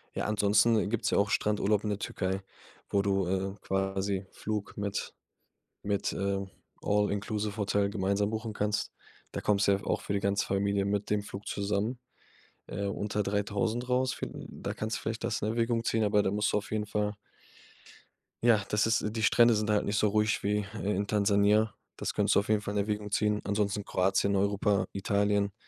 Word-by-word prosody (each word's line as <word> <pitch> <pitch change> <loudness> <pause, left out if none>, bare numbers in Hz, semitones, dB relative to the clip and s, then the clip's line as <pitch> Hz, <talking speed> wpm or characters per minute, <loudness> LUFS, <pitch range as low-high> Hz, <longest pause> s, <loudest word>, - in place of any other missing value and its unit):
Ja, - - -1
ansonsten, 105 +2 +3
äh, - - 0
gibt's 110 +1 0
ja - - +2
auch 100 +1 +2
Strandurlaub 105 0 +1
in 105 - -1
der 105 - -1
Türkei, 95 -1 -2 0.5
wo 100 - +2
du, 100 -1 +1
äh, 95 +1 -1
quasi 95 0 -1
Flug 105 -1 -4
mit 100 0 -3 0.7
mit, 100 -1 0
äh, 100 0 -1 0.4
all-inclusive-Hotel 105 0 0
gemeinsam 100 0 0
buchen 110 0 -3
kannst. 105 0 -1 0.4
Da - - -3
kommst 105 0 +2
du - - +6
ja 100 - +2
f - - -12
auch - - 0
für - - -4
die 100 - +1
ganze 100 0 +1
Familie 100 0 +1
mit 100 +1 -1
dem 105 -1 +1
Flug 100 0 -8
zusammen, 100 +4 -1 0.7
äh, 100 +2 -3
unter 105 +1 -1
3.000 105 +4 -1
raus. 125 +1 +2
Viel - - -4 0.2
da - - -5
kannst 110 +1 -2
du - - -9
vielleicht 115 +1 -4
das 115 -2 -1
in - - +1
Erwägung 115 0 0
ziehen, 110 -1 +1
aber 105 0 +3
da - - +1
musst 105 +1 +1
du - - +4
auf 105 - -4
jeden 105 -1 -1
Fall 105 0 -1 1.3
Ja, 115 -3 +5
das 105 0 +2
ist 110 -1 +2
äh, - - -1
die 110 +1 -3
Strände 115 +1 +5
sind 105 0 -1
da - - +4
halt 105 - +1
nicht 105 +1 0
so 105 - +3
ruhig 105 +1 +1
wie 105 0 +1 0.2
i 100 - 0
in 100 +1 -1
Tansania. 105 +1 +3 0.2
Das - - -3
könntest - - +2
du 100 - +6
auf 100 - -10
jeden 110 -1 +4
Fall 100 0 -5
in 105 - -1
Erwägung 105 0 -1
ziehen. 105 0 +1
Ansonsten 100 0 0
Kroatien, 95 +2 +1
Europa, 100 0 +2
Italien 100 0 +1
105 Hz, 200 wpm, -30 LUFS, 100-105 Hz, 1.3 s, du